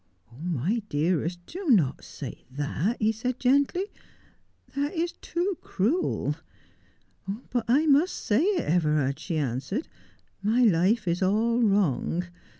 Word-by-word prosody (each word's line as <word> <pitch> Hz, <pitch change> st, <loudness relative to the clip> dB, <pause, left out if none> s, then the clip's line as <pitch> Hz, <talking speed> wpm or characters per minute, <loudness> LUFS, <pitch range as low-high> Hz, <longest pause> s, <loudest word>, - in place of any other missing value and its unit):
"Oh, 120 Hz, -, -15 dB
my 175 Hz, -, 0 dB
dearest, 170 Hz, +3 st, 0 dB
do 370 Hz, -, -7 dB
not 175 Hz, -, +3 dB
say -, -, -8 dB
that," 145 Hz, -, -1 dB
he 215 Hz, 0 st, +3 dB
said 235 Hz, +3 st, -3 dB
gently. 280 Hz, +8 st, +2 dB, 0.9 s
''That 285 Hz, +1 st, -1 dB
is 340 Hz, +1 st, 0 dB
too 355 Hz, +2 st, -3 dB
cruel." 250 Hz, -, 0 dB, 0.5 s
" 200 Hz, +6 st, -10 dB
But 245 Hz, -2 st, 0 dB
I 275 Hz, +7 st, +4 dB
must 305 Hz, +4 st, +4 dB
say 215 Hz, +5 st, +1 dB
it, 400 Hz, 0 st, +2 dB
Everard," 150 Hz, -4 st, +1 dB
she 165 Hz, 0 st, -3 dB
answered. 145 Hz, -, -2 dB, 0.3 s
" -, -, -39 dB
My 225 Hz, +5 st, +3 dB
life 200 Hz, +1 st, +3 dB
is 170 Hz, +2 st, 0 dB
all 225 Hz, +5 st, +2 dB
wrong. 185 Hz, -, +2 dB
210 Hz, 140 wpm, -27 LUFS, 165-260 Hz, 0.9 s, I